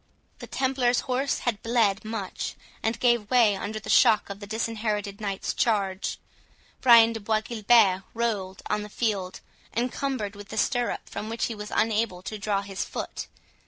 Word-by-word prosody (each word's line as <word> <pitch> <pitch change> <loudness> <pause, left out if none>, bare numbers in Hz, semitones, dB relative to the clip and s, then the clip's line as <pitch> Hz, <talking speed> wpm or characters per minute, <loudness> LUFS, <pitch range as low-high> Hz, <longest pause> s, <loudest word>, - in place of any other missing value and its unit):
The - - -8
Templars 260 -2 +1
horse 260 +2 -1
had 230 -4 0
bled 225 -3 +2
much, 215 -3 -4 0.3
and 225 +1 -1
gave 240 -4 +2
way 235 -5 +5
under 210 +3 -4
the 200 - -12
shock 210 -2 +5
of 200 - -7
the 205 - -9
Disinherited 215 -2 -2
Knight's 200 -2 -2
charge. 200 -4 0 0.6
Brian 230 -2 +7
de 225 - -4
Bois 215 +1 0
Guilbert 215 -4 +4
rolled 205 -5 -2
on 210 - 0
the 210 - -7
field, 205 -5 -2 0.4
encumbered 245 -3 -2
with 205 0 -11
the 220 - -6
stirrup, 245 +1 0
from 215 - -6
which 230 +1 -1
he 235 - -3
was 210 -1 -7
unable 215 -4 0
to 215 +2 -6
draw 200 -1 0
his 195 -1 -4
foot. - - -5
215 Hz, 165 wpm, -26 LUFS, 200-235 Hz, 0.6 s, Brian